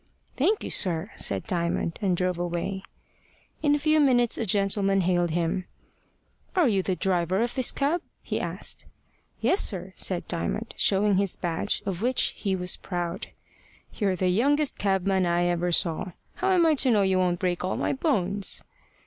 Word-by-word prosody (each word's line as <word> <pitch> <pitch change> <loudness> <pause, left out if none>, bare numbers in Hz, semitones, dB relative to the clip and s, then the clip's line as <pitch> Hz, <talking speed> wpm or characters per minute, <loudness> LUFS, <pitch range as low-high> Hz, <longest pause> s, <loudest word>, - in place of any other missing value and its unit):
"Thank 390 +11 +1
you, - - -5
sir," 180 +2 0
said - - -1
Diamond, 170 -3 -1
and 185 -4 +1
drove 180 -1 -1
away. 175 +2 -3 0.8
In 290 -2 +3
a - - +1
few 310 +1 +2
minutes 245 -5 +3
a 230 - -2
gentleman 195 0 +2
hailed 175 -1 +1
him. 170 +2 -1 0.9
"Are 355 -6 +4
you 200 -5 +2
the 185 0 -1
driver 180 0 0
of 240 - -2
this 260 -3 +1
cab?" 300 +5 0 0.2
he - - -2
asked. - - -3 0.5
"Yes, 385 - +3
sir" 185 -1 -3
said 180 -2 -2
Diamond, 205 +6 -3
showing 200 0 +2
his 195 -1 0
badge, 175 +3 -2
of 190 -2 -3
which, 250 +2 +2
he 195 -2 -1
was 180 -1 +1
proud. 175 0 -4 0.7
"You're 195 -4 0
the 185 0 0
youngest 285 +9 +1
cabman 190 -1 +1
I 175 0 +2
ever 175 0 0
saw. 170 +1 0 0.2
How 380 - 0
am 360 -3 +4
I 320 - +5
to 270 -2 +2
know 210 -4 +4
you 190 -1 +2
won't 175 -1 +1
break 180 -1 -1
all 185 - -1
my - - 0
bones?" 205 - +1
190 Hz, 175 wpm, -26 LUFS, 175-235 Hz, 0.9 s, I